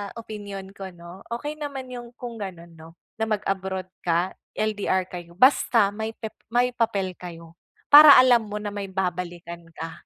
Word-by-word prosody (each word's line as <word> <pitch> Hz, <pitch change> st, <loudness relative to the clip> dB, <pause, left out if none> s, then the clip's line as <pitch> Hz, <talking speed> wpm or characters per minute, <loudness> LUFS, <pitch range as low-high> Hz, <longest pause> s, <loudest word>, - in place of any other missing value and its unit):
opinyon 205 Hz, -4 st, -8 dB
ko 195 Hz, -1 st, -8 dB
'no, 175 Hz, +2 st, -12 dB
okey 295 Hz, +5 st, -5 dB
naman 270 Hz, -3 st, -6 dB
'yung 240 Hz, -1 st, -9 dB
kung 240 Hz, -3 st, -8 dB
gano'n 175 Hz, -4 st, -8 dB
'no, 165 Hz, +1 st, -14 dB, 0.2 s
na 220 Hz, -, +1 dB
mag-abroad 190 Hz, -3 st, -2 dB, 0.2 s
ka, 175 Hz, +2 st, +1 dB, 0.2 s
LDR 205 Hz, -3 st, 0 dB
kayo 175 Hz, -1 st, -9 dB
basta 230 Hz, -3 st, +4 dB
may 220 Hz, +1 st, -5 dB
pep 220 Hz, -2 st, -7 dB, 0.2 s
may 245 Hz, +1 st, +3 dB
papel 215 Hz, -6 st, -1 dB
kayo 170 Hz, -1 st, -10 dB, 0.3 s
para 295 Hz, 0 st, +11 dB
alam 245 Hz, -3 st, +5 dB
mo 205 Hz, -, -6 dB
na 205 Hz, -1 st, -4 dB
may 200 Hz, -1 st, -5 dB
babalikan 175 Hz, -2 st, -4 dB
ka. 165 Hz, 0 st, -8 dB
200 Hz, 160 wpm, -24 LUFS, 180-235 Hz, 0.3 s, para